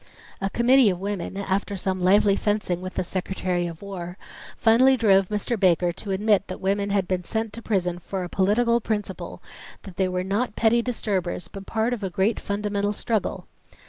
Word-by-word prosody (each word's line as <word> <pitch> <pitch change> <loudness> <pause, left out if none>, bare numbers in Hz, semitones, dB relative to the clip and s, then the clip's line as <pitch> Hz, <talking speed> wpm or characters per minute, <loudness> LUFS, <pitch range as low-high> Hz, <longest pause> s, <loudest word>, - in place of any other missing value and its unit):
A 195 - 0
committee 240 +2 +5
of 180 -2 -2
women, 195 -1 -4
after 200 0 -1
some 185 0 -2
lively 200 +2 +4
fencing 205 -4 -1
with 185 0 -7
the 185 - 0
Secretary 180 -1 -2
of 165 +2 -9
War, 180 -2 -6 0.4
finally 255 +4 +5
drove 195 -5 +4
Mr. 215 +2 -2
Baker 180 -2 +3
to 200 +4 -9
admit 205 +1 +2
that 185 - -6
women 200 +1 0
had 200 -2 +1
been 180 0 -1
sent 220 +2 -3
to 230 - -7
prison 180 -6 -1
for 185 +2 -4
a - - -4
political 235 +6 +2
principle; 210 -3 -4 0.4
that 185 -3 -11
they 190 - +2
were 180 0 -2
not 210 +4 -1
petty 230 +1 +3
disturbers 200 -8 -2
but 195 -1 -10
part 225 +2 0
of 235 - -4
a 195 - -2
great 195 +5 +1
fundamental 205 0 -1
struggle. 220 0 -2
200 Hz, 185 wpm, -24 LUFS, 185-215 Hz, 0.4 s, committee